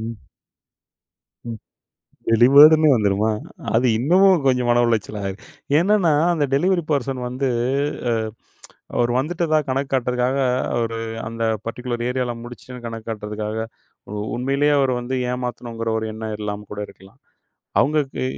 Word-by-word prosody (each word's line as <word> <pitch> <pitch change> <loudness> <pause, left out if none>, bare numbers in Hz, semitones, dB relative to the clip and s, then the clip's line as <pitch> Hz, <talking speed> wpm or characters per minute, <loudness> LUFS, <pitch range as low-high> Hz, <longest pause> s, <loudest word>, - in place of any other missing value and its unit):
ம். 115 +1 -5 1.3
ம். 115 -2 -6 0.7
டெலிவர்டுன்னு 145 +7 +7
வந்துருமா! 105 0 +1 0.4
அது 120 +3 +3
இன்னமும் 180 +6 +4
கொஞ்சம் 125 -2 +2
மன 120 0 +4
உளைச்சலாயிரும். 105 -3 -2 0.4
என்னன்னா, 185 -1 +3 0.2
அந்த 155 -4 +1
டெலிவரி 180 +5 +2
பெர்சன் 135 -2 -1
வந்து, 130 +2 -2 1.5
அவரு 120 0 +2
வந்துட்டதா 155 +2 +1
கணக்கு 135 +1 -1
காட்டுறதுக்காக 125 +1 0 0.4
அவரு 115 -1 -1 0.3
அந்த 115 +1 -5 0.2
பர்ட்டிகுலர் 120 +1 -4
ஏரியால 125 -1 -1
முடிச்சுட்டேன்னு 120 +1 -10
கணக்கு 115 -1 -7
காட்டுறதுக்காக, 105 0 -4 0.4
உ - - -6 0.2
உண்மையிலே 140 +4 +1
அவரு 135 -2 +2
வந்து 125 +2 -3 0.2
ஏமாத்தணுங்கிற 120 -2 -4
ஒரு 110 - -3
எண்ணம் 110 0 -5
இல்லாம 105 0 -5
கூட 105 - -5
இருக்கலாம். 95 +1 -17 0.6
அவுங்களுக்கு 145 -3 0
125 Hz, 120 wpm, -21 LUFS, 115-140 Hz, 1.5 s, டெலிவர்டுன்னு